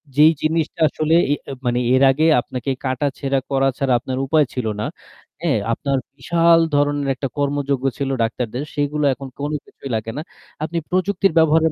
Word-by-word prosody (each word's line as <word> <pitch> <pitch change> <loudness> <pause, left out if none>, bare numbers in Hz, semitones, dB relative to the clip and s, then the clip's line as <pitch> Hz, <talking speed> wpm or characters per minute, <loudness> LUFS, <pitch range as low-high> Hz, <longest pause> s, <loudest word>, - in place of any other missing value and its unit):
যেই 155 +2 +7
জিনিসটা 160 0 -1
আসলে 155 +3 +1 0.2
এ - - +2 0.3
মানে 120 0 +1
এর 130 - +4
আগে 155 +4 +1 0.2
আপনাকে 130 +2 -4
কাটাছেঁড়া 135 +1 -1
করা 135 0 +3
ছাড়া 135 -2 +1
আপনার 130 +2 -4
উপায় 150 +1 +3
ছিল 125 -3 -3 0.2
না। - - -1 0.6
হ্যাঁ? - - +1 0.2
আপনার 140 +2 -1 0.2
বিশাল 165 +4 +4 0.2
ধরনের 145 -1 +1
একটা 135 - -3
কর্মযোগ্য 140 -2 -1
ছিল 140 -1 -2
ডাক্তারদের। 120 +3 -3
সেগুলো 145 +1 0
এখন 135 +1 -8
কোনো 145 +2 -2
কিছুই 135 - -10
লাগে 110 +1 -3
না। - - -2 0.4
আপনি 165 +2 -3
প্রযুক্তির 190 0 +1
ব্যবহারের 160 0 +4
145 Hz, 165 wpm, -20 LUFS, 135-155 Hz, 0.6 s, যেই